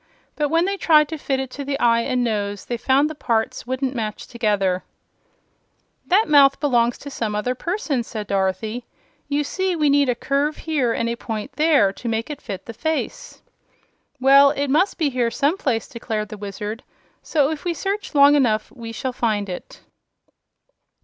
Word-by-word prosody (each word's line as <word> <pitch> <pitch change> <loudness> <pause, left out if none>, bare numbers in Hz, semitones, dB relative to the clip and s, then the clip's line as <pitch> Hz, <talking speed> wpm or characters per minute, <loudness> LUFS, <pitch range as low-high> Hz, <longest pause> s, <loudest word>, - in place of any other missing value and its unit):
But 295 -1 0
when 330 +3 +2
they 395 +1 -1
tried 305 -5 +5
to 320 - -4
fit 270 -2 -1
it 265 -1 -4
to 285 - -6
the 275 0 -3
eye 230 -3 +4
and 250 0 0
nose 205 -3 -2
they 240 - -3
found 265 +5 +2
the 310 - -5
parts 230 -5 -2
wouldn't 260 +1 -2
match 215 -4 -4
together. 205 -6 0 1.2
"That 405 +5 +3
mouth 280 -2 +5
belongs 240 -4 +2
to 285 - -9
some 215 -5 -3
other 210 +4 -1
person," 315 - -2
said 220 -2 -6
Dorothy. 200 +4 -2 0.4
"You 290 +1 0
see 375 +4 -1
we 300 -3 +2
need 285 -2 +3
a 245 - +2
curve 280 +5 -1
here 290 -7 0
and 230 - -1
a 235 - -1
point 225 +2 -5
there, 280 -8 +3
to 235 - -5
make 225 +5 -2
it 290 - -7
fit 195 -5 -7
the 230 - -7
face." 315 +6 -4 0.8
"Well, 275 +2 +7
it 280 -1 -1
must 360 +8 +2
be 305 -5 +1
here 245 -2 +1
some 285 +8 +1
place," 250 - -1
declared 225 -4 -4
the 215 - -7
Wizard; 210 +3 -6 0.4
"so 295 -2 +1
if 315 - -5
we 345 -1 -1
search 395 +2 -3
long 285 0 +7
enough 225 -7 +2
we 230 -3 -8
shall 255 +3 -4
find 215 -4 -1
it." 180 - -8
255 Hz, 185 wpm, -22 LUFS, 225-290 Hz, 1.2 s, Well